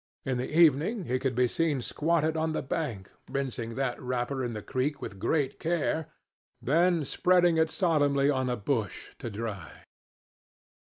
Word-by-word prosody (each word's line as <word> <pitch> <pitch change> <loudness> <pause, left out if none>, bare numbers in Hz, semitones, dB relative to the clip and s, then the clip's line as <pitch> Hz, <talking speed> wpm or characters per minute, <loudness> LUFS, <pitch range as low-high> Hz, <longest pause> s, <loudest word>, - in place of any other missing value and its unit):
In 130 -2 -1
the 125 - -3
evening 165 - +3
he 130 0 0
could 130 -2 -1
be 125 0 +3
seen 155 +1 0
squatted 160 0 0
on 160 0 0
the - - -2
bank 130 -10 -3 0.2
rinsing 120 -4 -3
that 130 -2 -2
wrapper 125 +1 -2
in 120 -1 -3
the 105 -2 -6
creek 140 +2 -1
with 100 - -7
great 145 +4 0
care, 160 -2 0 0.5
then 165 +2 +2
spreading 175 +2 +3
it 160 0 +3
solemnly 145 -7 +2
on 130 -3 +1
a 125 - -1
bush 110 -2 -2
to 120 - -5
dry. 100 - -6
140 Hz, 160 wpm, -29 LUFS, 125-160 Hz, 0.5 s, evening